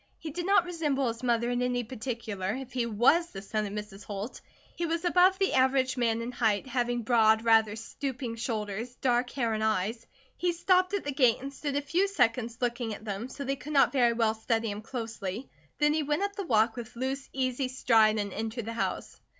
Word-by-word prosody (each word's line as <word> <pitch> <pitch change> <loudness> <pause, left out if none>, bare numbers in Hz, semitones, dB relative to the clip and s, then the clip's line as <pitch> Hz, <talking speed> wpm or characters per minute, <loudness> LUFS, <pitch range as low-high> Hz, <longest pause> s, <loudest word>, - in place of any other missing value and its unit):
He 315 - -7
did 350 +4 -4
not 395 -3 +5
resemble 295 -7 0
his 230 0 -6
mother 240 -1 +1
in 245 0 0
any 250 0 0
particular, 220 -4 -4
if 260 -1 -8
he 245 -2 0
was 250 +10 +3
the 195 -11 -8
son 215 +1 -2
of 200 - -7
Mrs. 210 -1 -7
Holt. 205 +4 -6 0.3
He 340 - -2
was 335 +2 -2
above 365 +2 +5
the 390 0 +1
average 260 0 +3
man 230 -2 0
in 240 - -4
height, 220 -3 +1
having 245 -2 -1
broad, 220 -1 +4
rather 220 -2 +4
stooping 250 +1 -5
shoulders, 225 0 -4
dark 245 -1 +1
hair 235 -4 -1
and 215 0 -1
eyes. 220 +2 -1 0.3
He 355 -1 +1
stopped 370 +2 +2
at 400 - -2
the 285 - -2
gate 255 -4 +4
and 275 +2 -7
stood 285 0 -4
a 285 - +1
few 355 +7 +1
seconds 240 - +1
looking 235 -2 -1
at 215 - -13
them, 210 +4 -4
so 280 - -6
they 275 0 -1
could 300 +3 -8
not 275 - +5
very 245 -4 +3
well 225 -2 +2
study 225 0 -1
him 205 +1 -6
closely, 225 -2 -5 0.3
then 295 0 +3
he 315 - +1
went 295 +5 0
up 405 0 -2
the 395 -4 -5
walk 225 -1 +3
with 240 -1 -8
loose, 265 +2 -3
easy 260 0 -1
stride 225 -4 +3
and 200 -2 -2
entered 225 +1 -4
the 230 - -4
house. 230 - -3
240 Hz, 215 wpm, -29 LUFS, 225-275 Hz, 0.3 s, not